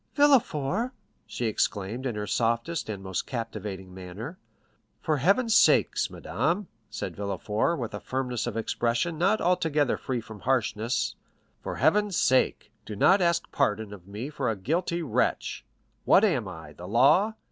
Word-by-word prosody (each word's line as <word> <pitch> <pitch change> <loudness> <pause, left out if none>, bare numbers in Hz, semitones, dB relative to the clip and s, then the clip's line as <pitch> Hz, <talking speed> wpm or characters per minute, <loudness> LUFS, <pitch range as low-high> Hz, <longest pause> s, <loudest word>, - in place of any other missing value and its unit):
"Villefort," 240 - +3 0.3
she 120 - -4
exclaimed 110 +3 -1
in 120 - -3
her 105 0 -3
softest 115 +8 -1
and 100 -3 -5
most 95 -1 -3
captivating 105 -6 -5
manner. 95 - -8 0.6
"For 155 -2 0
Heaven's 205 - +3
sake, - - +5 0.2
madame," 170 - -1 0.2
said - - -5
Villefort, 105 - -1
with 120 -5 -4
a 105 - -4
firmness 125 -1 -3
of 115 -2 -3
expression 120 +8 -1
not 195 +5 +3
altogether 155 -6 +1
free 130 -2 -3
from 110 -2 -10
harshness—"for 110 - -2
Heaven's 210 -3 +2
sake, 130 -4 +2
do 105 - -7
not 190 - +5
ask 170 -1 +1
pardon 110 -6 0
of 95 -3 -12
me 110 +8 -6
for 135 -4 -1
a 110 - 0
guilty 170 - -1
wretch! 130 -9 -1 0.4
What 195 - +5
am 140 - +2
I?—the 80 -1 -9
law. 150 - +4
125 Hz, 145 wpm, -27 LUFS, 105-170 Hz, 0.6 s, sake